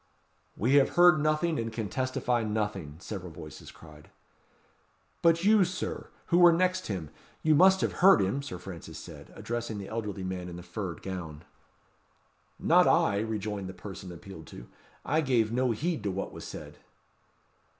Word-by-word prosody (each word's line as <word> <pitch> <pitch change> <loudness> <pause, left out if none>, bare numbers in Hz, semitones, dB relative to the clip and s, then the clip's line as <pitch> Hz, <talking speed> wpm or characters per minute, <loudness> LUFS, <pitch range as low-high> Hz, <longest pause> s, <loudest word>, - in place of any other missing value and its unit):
"We 125 +6 +1
have 140 - +3
heard 175 -3 +6
nothing, 155 +2 +1
and 115 0 -3
can 110 -2 -3
testify 130 +1 -1
nothing," 105 -8 -3
several 90 -1 -7
voices 75 -2 -10
cried. 75 -2 -15 1.1
"But 165 0 +4
you, 210 0 +6
Sir, 180 +1 -4 0.2
who 175 - +3
were 175 -1 +8
next 185 +2 +1
him, 90 -8 -4 0.3
you 155 - +4
must 190 +4 +6
have - - +1
heard 190 - +8
him?" 100 +8 0
Sir 140 -10 -6
Francis 90 -2 -9
said, - - -11
addressing 120 -2 -4
the 100 -1 -7
elderly 105 -4 -4
man 90 -1 -4
in 85 - -8
the 90 - -9
furred 90 -1 -6
gown. 85 -6 -6 1.1
"Not - - +4
I!" 100 - +3
rejoined 105 -3 -3
the 95 - -9
person 95 -2 -8
appealed 85 -2 -11
to; - - -11 0.4
"I 155 +2 +2
gave 120 -6 +1
no 125 +1 +1
heed 155 +6 -1
to 105 - -2
what 95 +1 -4
was - - -8
said." - - -9
110 Hz, 165 wpm, -29 LUFS, 95-150 Hz, 1.1 s, were